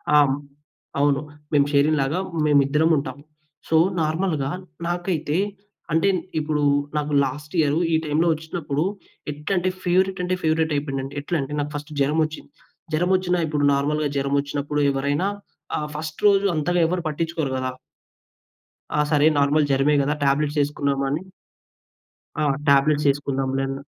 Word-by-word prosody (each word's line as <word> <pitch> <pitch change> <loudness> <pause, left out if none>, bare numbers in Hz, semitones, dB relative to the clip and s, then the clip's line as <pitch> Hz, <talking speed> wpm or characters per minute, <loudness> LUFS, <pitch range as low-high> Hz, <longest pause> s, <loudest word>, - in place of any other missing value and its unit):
ఆ! - - +8
హ్మ్. 135 - +1 0.6
అవును. 140 -1 +3 0.3
మేము 145 -1 +5
షేరింగ్‌ 150 +2 +3
లాగా 140 +6 0 0.3
మేమిద్దరం 145 +2 +3
ఉంటాం. 135 -2 -4 0.5
సో, 160 - +4 0.2
నార్మల్‌గా 155 -3 0 0.4
నాకైతే 175 -3 -1 0.6
అంటే 165 +5 +3 0.3
ఇప్పుడు 150 -1 -1 0.4
నాకు 150 0 -1
లాస్ట్‌ 145 +5 -5
ఇయరు 150 +1 +2
ఈ - - +5
టైంలో 155 +3 +1
ఒచ్చినప్పుడు, 155 -1 -3 0.5
ఎట్లంటే 175 +5 -1
ఫేవరెట్ 185 +1 +2
అంటే 180 +1 0
ఫేవరేటయిపోయిందండి. 145 -4 -1
ఎట్లంటే, 145 -2 -2
నాకు 145 0 -2
ఫస్టు 145 +1 -6
జరమొచ్చింది. 155 +1 0 0.5
జరమొచ్చినా 180 +2 +1
ఇప్పుడు 150 -1 -1
నార్మల్‌గా 145 +2 0
జరమొచ్చినప్పుడు 140 +1 -1
ఎవరైనా, 140 +6 0 0.5
ఆ - - -1 0.2
ఫస్ట్ 155 0 -5
రోజు 200 0 +4
అంతగా 175 +4 +1
ఎవరు 180 +1 -1
పట్టించుకోరు 160 -2 -2
కదా! 130 0 -2 1.2
ఆ! 150 - +1
సరే. 150 0 +5
నార్మల్ 145 +1 +3
జరమె 135 +2 +3
కదా! 140 +2 +1
టాబ్లెట్సేసుకున్నాము 140 -1 +1
అని 150 +4 -1 1.2
ఆ! - - +2 0.2
టాబ్లెట్సేసుకున్నాం 140 -1 +2
లే 135 - 0
అన్న 135 0 -4
150 Hz, 125 wpm, -23 LUFS, 140-160 Hz, 1.2 s, ఆ